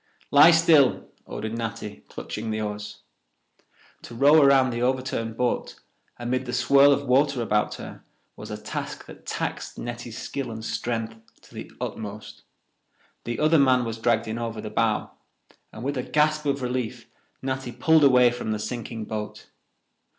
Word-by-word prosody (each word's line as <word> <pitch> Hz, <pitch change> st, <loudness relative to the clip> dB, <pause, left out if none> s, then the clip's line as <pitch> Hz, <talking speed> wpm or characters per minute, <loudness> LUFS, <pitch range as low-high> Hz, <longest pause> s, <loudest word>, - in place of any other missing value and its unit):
"Lie 145 Hz, +3 st, +8 dB
still," 165 Hz, -5 st, +4 dB, 0.2 s
ordered 110 Hz, +1 st, -5 dB
Natty, 105 Hz, -8 st, -5 dB
clutching 110 Hz, +1 st, -6 dB
the 110 Hz, 0 st, -2 dB
oars. 105 Hz, -1 st, -5 dB, 1.0 s
To 120 Hz, -, -10 dB
row 145 Hz, +5 st, +6 dB
around 135 Hz, -2 st, +5 dB
the 120 Hz, 0 st, -3 dB
overturned 125 Hz, -3 st, -1 dB
boat, 125 Hz, -1 st, -2 dB, 0.4 s
amid 125 Hz, +2 st, -2 dB
the 125 Hz, -, -4 dB
swirl 140 Hz, +4 st, +5 dB
of 140 Hz, 0 st, +1 dB
water 140 Hz, +1 st, +2 dB
about 105 Hz, -2 st, 0 dB
her, -, -, -10 dB, 0.3 s
was -, -, -9 dB
a -, -, -5 dB
task -, -, -6 dB
that -, -, -14 dB
taxed -, -, -4 dB
Netty's 120 Hz, -1 st, -6 dB
skill 135 Hz, -3 st, -5 dB
and 110 Hz, -1 st, -7 dB
strength 115 Hz, -1 st, -3 dB, 0.3 s
to -, -, -19 dB
the -, -, -8 dB
utmost. 105 Hz, 0 st, -7 dB, 0.8 s
The 120 Hz, 0 st, -3 dB
other 155 Hz, +1 st, +4 dB
man 130 Hz, -3 st, +4 dB
was 115 Hz, -1 st, -5 dB
dragged 115 Hz, 0 st, +1 dB
in 110 Hz, +1 st, -3 dB
over 115 Hz, -2 st, -4 dB
the 105 Hz, 0 st, -6 dB
bow, 115 Hz, -2 st, 0 dB, 0.6 s
and 110 Hz, -, -9 dB
with 140 Hz, +1 st, -2 dB
a -, -, -6 dB
gasp 150 Hz, 0 st, +2 dB
of 140 Hz, -1 st, -1 dB
relief 125 Hz, -2 st, -3 dB, 0.4 s
Natty 130 Hz, -1 st, -3 dB
pulled 155 Hz, +6 st, +3 dB
away 125 Hz, -3 st, +6 dB
from 120 Hz, -3 st, -3 dB
the -, -, -2 dB
sinking 115 Hz, 0 st, -5 dB
boat. 105 Hz, -1 st, -6 dB
120 Hz, 160 wpm, -25 LUFS, 110-135 Hz, 1.0 s, Lie